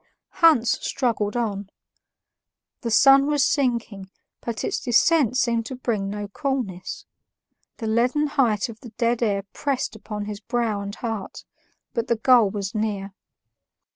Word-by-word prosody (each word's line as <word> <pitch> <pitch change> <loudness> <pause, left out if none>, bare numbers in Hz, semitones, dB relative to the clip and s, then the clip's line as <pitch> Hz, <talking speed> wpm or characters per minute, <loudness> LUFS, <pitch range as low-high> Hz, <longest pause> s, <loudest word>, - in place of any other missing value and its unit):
Hans 275 -9 +4
struggled 230 -4 -1
on. 205 -4 -2 1.1
The 235 - -3
sun 275 +5 +6
was 295 -2 +2
sinking, 235 -8 -1 0.3
but 230 -2 -4
its - - -1
descent 255 +1 +3
seemed 235 -3 +1
to 260 - -6
bring 220 -6 -2
no 205 0 -4
coolness; 225 -6 -4 0.7
the 225 - -5
leaden 245 +7 +2
height 235 -8 +1
of 225 -2 -10
the 235 - -11
dead 235 0 +1
air 200 -4 +1
pressed 270 -5 -2
upon 210 -1 -6
his 205 -1 -6
brow 225 -2 -1
and 200 +1 -6
heart, 225 -4 -5 0.5
but 230 0 -2
the 235 - +2
goal 235 -2 +5
was 200 0 -4
near. 205 -3 -2
230 Hz, 140 wpm, -24 LUFS, 205-255 Hz, 1.1 s, sun